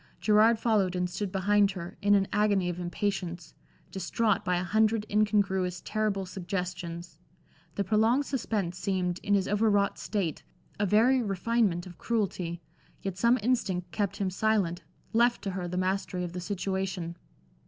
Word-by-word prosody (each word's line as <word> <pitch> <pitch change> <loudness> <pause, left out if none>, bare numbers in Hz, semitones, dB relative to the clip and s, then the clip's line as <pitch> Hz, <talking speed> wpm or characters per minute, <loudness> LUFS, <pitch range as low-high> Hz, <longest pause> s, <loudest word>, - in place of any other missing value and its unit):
Gerard 220 +2 +5
followed 210 -5 +1
and 180 0 0
stood 190 +2 -4
behind 200 +1 +3
her, 175 -2 -7
in 205 0 +4
an 195 -1 +2
agony 200 -3 +2
of 175 0 -4
impatience, 175 -2 -3 0.4
distraught 200 +3 0
by 180 -1 +1
a 175 - -1
hundred 215 +3 +2
incongruous, 195 -4 +1
terrible 210 -3 -1
suggestions. 175 -3 -5 0.6
The 200 - 0
prolonged 225 +7 +2
suspense 210 -10 -2
seemed, 185 -3 -1
in 205 -1 +2
his 195 -2 +1
over 210 +2 +2
wrought 200 -1 +1
state, 195 -7 -2 0.4
a 205 - +2
very 240 +6 +4
refinement 200 -3 0
of 180 -2 -12
cruelty, 180 -7 -2 0.4
yet 195 -2 -3
some 235 +4 +4
instinct 190 -8 0
kept 200 0 -1
him 195 -2 -1
silent, 190 -4 +1 0.3
left 240 +1 +3
to 195 - -2
her 180 -1 -4
the 180 +1 -4
mastery 185 -1 -1
of 175 -1 -5
the 180 - -4
situation. 190 -2 -3
195 Hz, 155 wpm, -29 LUFS, 180-215 Hz, 0.6 s, Gerard